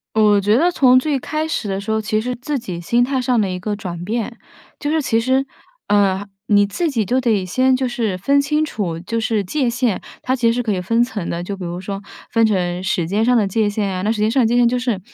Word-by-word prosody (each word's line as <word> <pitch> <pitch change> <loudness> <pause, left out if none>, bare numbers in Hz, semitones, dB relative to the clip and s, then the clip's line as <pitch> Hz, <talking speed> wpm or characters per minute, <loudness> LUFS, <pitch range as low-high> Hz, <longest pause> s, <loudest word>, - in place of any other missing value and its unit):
我 210 -2 +5
觉 205 +4 +3
得 345 +5 +3
从 255 -6 +5
最 285 0 0
开 310 +4 -3
始 320 - -2
的 195 0 -2
时 205 - -6
候， 220 - +2
其 215 0 0
实 250 +3 -3
自 280 +4 -3
己 190 -8 -6
心 235 +8 +2
态 265 +2 0
上 245 -2 +1
的 200 - +1
一 180 - -3
个 205 +3 -3
转 175 -4 -6
变， 230 +3 -3 0.4
就 290 - -2
是 320 +1 +2
其 225 -5 +1
实 260 +3 +1 0.4
呃， 200 -1 +2 0.2
你 205 -1 +5
自 315 - -1
己 235 -6 0
就 255 +5 +1
得 220 -7 +1
先 255 +7 +2
就 255 0 0
是 220 -6 -2
分 280 +9 +2
清 300 +2 +1
楚， 190 - -3
就 230 +6 -3
是 220 -2 0
界 255 +6 0
限， 240 -4 -1 0.2
它 260 +1 0
其 235 - 0
实 230 - +5
是 245 +1 -1
可 225 - -2
以 185 -3 -1
分 230 +6 +2
层 225 -7 -3
的， 170 +1 -3
就 195 +2 -5
比 185 - -7
如 175 +1 -5
说 195 +1 -5 0.3
分 230 -1 +3
成 180 -4 0
时 180 -4 0
间 210 +4 +1
上 250 - +3
的 215 -5 +3
界 210 +1 +1
限 205 -1 -1
呀， 185 -1 -3
那 215 +3 +1
时 215 - -4
间 215 +1 +2
上 260 +1 +3
的 - - +3
界 230 - +1
限， 240 -1 +5
就 250 - 0
是 245 -6 -1
225 Hz, 290 characters per minute, -19 LUFS, 195-250 Hz, 0.4 s, 我